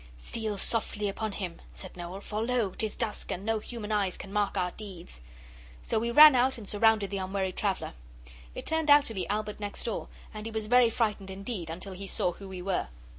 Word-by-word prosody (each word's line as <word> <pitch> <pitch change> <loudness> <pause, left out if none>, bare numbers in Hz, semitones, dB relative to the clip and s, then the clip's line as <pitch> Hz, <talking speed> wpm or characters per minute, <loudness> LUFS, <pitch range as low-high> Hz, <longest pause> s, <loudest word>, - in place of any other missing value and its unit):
'Steal 215 - -3
softly 210 0 -1
upon 215 +2 -2
him,' 185 -4 -5
said 185 - -8
Noel; 180 +2 -6
'for 210 +1 -3
lo! 235 -4 +1
'tis 215 +2 -1
dusk, 220 -3 -1
and 190 +3 -4
no 225 0 +1
human 220 -1 -6
eyes 200 -3 +1
can 195 - -9
mark 205 -1 +1
our 180 0 +1
deeds.' 180 - -9 0.6
So - - 0
we 235 +2 -1
ran 300 +4 +10
out 255 +1 +3
and 215 -4 -9
surrounded 215 -1 +3
the 200 - -1
unwary 190 0 -1
traveller. 195 - -2 0.6
It - - -6
turned 320 -1 0
out 290 0 +8
to 225 - -3
be 185 -5 -3
Albert 210 0 -2
next 205 -1 -4
door, 230 - -3 0.3
and 215 +1 -6
he - - -5
was 220 -1 -1
very 245 +1 +6
frightened 215 -4 -1
indeed 190 -2 -5
until 185 +4 -5
he 195 +1 -7
saw 180 - 0
who 195 +2 -10
we 185 -1 -6
were. 190 -1 0
210 Hz, 215 wpm, -29 LUFS, 190-225 Hz, 0.6 s, ran